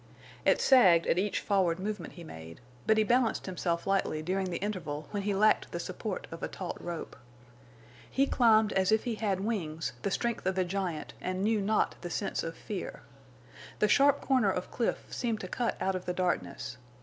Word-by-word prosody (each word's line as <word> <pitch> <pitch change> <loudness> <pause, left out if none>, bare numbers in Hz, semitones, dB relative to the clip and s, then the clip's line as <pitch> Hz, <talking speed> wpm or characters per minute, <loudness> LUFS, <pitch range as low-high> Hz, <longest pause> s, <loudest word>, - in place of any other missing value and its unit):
It - - +4
sagged 185 -11 +6
at 175 - +2
each 205 +1 0
forward 185 -5 +2
movement 205 -3 -4
he 175 - -10
made, 80 - -10 0.3
but 220 - +5
he 215 - +5
balanced 240 +1 +2
himself 170 -2 -2
lightly 195 -5 0
during 190 +2 -1
the 170 - -2
interval 165 -7 -4
when 205 - -2
he 200 0 0
lacked 215 +2 +3
the - - -3
support - - -4
of - - -7
a - - -1
taut - - -6
rope. 170 -2 -5 0.9
He 275 - +2
climbed 220 -5 +4
as 190 +1 +2
if 220 0 +3
he 240 - -1
had 205 -4 -1
wings, 165 - -2
the - - 0
strength 235 0 -1
of 190 0 0
a 185 - +3
giant, 180 -4 -3
and 185 +1 -2
knew 215 0 +2
not 210 +2 +1
the 175 - -5
sense 195 +4 -2
of 165 0 -5
fear. 200 -4 -6 0.7
The 210 - +3
sharp 285 +4 +4
corner 255 -7 +3
of 180 -1 -3
cliff 235 - -1
seemed 230 -3 -1
to 185 - -5
cut 235 +5 -1
out 190 - 0
of 185 -1 -4
the 180 - -1
darkness. 180 -7 -2
195 Hz, 195 wpm, -30 LUFS, 175-220 Hz, 0.9 s, sagged